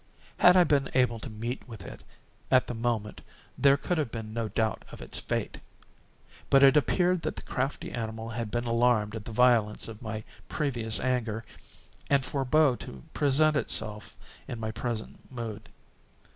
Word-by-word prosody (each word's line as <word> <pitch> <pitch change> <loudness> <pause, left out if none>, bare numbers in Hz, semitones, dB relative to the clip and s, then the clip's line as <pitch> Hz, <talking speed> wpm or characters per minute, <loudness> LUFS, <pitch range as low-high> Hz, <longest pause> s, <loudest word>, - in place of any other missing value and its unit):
Had 180 +1 +7
I 180 - +8
been 145 -4 +2
able 125 -3 +2
to 130 - -7
meet 115 +3 -5
with 110 -5 -10
it, - - -10 0.5
at 130 -1 +5
the - - -5
moment, 115 -2 -2 0.3
there 140 0 +5
could 175 +3 -1
have 150 - -1
been 110 -2 -6
no 115 -1 -2
doubt 110 -1 -1
of - - -10
its - - -2
fate; - - -3 0.9
but 135 0 +6
it 135 +1 +7
appeared 180 +4 +2
that - - -3
the - - -8
crafty 135 +2 -3
animal 110 -1 -4
had 115 -1 -4
been 120 +2 -2
alarmed 115 -2 +2
at 110 -2 -6
the - - -7
violence 115 -2 +3
of 115 0 -9
my 110 -2 -5 0.3
previous 120 -7 -1
anger, 115 -4 -1 0.6
and 140 -2 +3
forebore 140 0 +2
to 65 -2 -10
present 150 +2 +3
itself 105 -6 -2 0.3
in 120 - -5
my 110 -1 -3
present 115 +1 -5
mood. 115 -4 -6
120 Hz, 170 wpm, -28 LUFS, 110-135 Hz, 0.9 s, I